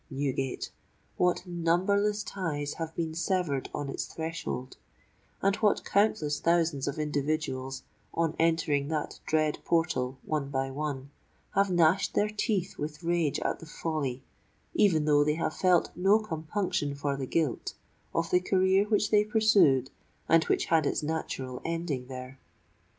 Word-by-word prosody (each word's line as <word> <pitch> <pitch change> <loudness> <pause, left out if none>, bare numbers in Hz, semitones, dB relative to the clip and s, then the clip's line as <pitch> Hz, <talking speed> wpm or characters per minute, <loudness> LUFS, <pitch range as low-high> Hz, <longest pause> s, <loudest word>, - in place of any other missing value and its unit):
Newgate!—what 140 +6 -3
numberless 190 +5 +1
ties 145 -6 -3
have 160 0 -4
been 165 -2 -2
severed 170 -5 -1
on 145 - -4
its 135 - -3
threshold;—and 165 +4 -5
what 210 -2 +2
countless 195 -8 +1
thousands 165 -5 +1
of 140 - -2
individuals, 145 -3 -2 0.3
on 165 -1 0
entering 160 -4 +2
that 155 -1 -3
dread 155 -1 +1
portal 135 -6 0
one 150 -3 -1
by 135 -1 -1
one, 140 -1 -4 0.4
have 195 0 +3
gnashed 175 +1 +3
their 210 - +2
teeth 210 -3 -1
with 150 +3 -5
rage 170 -3 +1
at - - -1
the 165 - -11
folly, 145 -6 -3 0.5
even 170 -8 +3
though 145 -1 +5
they 150 +1 +1
have 160 -1 -2
felt 180 -2 +3
no 195 +4 +4
compunction 160 -6 -2
for 140 0 -1
the 135 -1 -4
guilt, 155 -5 -1 0.4
of 165 0 -1
the 180 - +5
career 190 +2 +3
which 210 -1 +1
they 210 -1 +5
pursued 205 - +4 0.4
and 165 0 +5
which - - +1
had 160 -3 +3
its - - -1
natural 135 -5 -3
ending 165 -6 -3
there! 130 0 -8
160 Hz, 140 wpm, -29 LUFS, 145-180 Hz, 0.5 s, though